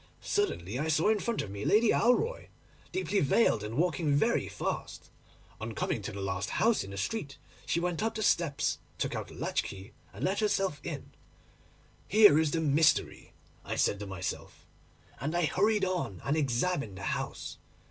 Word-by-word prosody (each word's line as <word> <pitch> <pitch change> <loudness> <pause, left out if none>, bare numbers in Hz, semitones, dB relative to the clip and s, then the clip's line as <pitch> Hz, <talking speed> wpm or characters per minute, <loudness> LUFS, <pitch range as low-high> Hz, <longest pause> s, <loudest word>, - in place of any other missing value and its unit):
Suddenly 135 - -1
I 155 - -1
saw 160 +5 +3
in 215 -1 +3
front 235 +2 -1
of 100 - -8
me 100 +1 -5
Lady 215 +2 +4
Alroy, 450 - +2 0.4
deeply 290 - 0
veiled 140 - +3
and 110 +3 -5
walking 165 -2 +1
very 145 - +2
fast. - - -5 0.5
On - - -5
coming - - -1
to - - -5
the 100 - -7
last 95 0 -2
house 230 0 +2
in 95 - -9
the 100 - -7
street, 140 - -3 0.3
she - - +1
went 175 -1 -1
up 225 +1 -1
the 220 - -2
steps, 165 -8 +1 0.2
took - - -2
out - - -4
a - - -12
latch - - 0
key, 100 +3 -9 0.2
and - - -8
let 195 +2 0
herself 195 -7 0
in. 150 -5 -6 1.0
"Here 205 -7 +7
is 160 -1 +2
the 160 +3 -1
mystery," 155 +1 +2 0.3
I - - -4
said 100 - +1
to 105 - -6
myself; 95 -1 -6 0.5
and 155 +6 -2
I 175 - +2
hurried 205 +4 +2
on 180 - -2
and 140 - +1
examined 140 - 0
the 95 - -8
house. - - -4
160 Hz, 180 wpm, -30 LUFS, -, 1.0 s, Here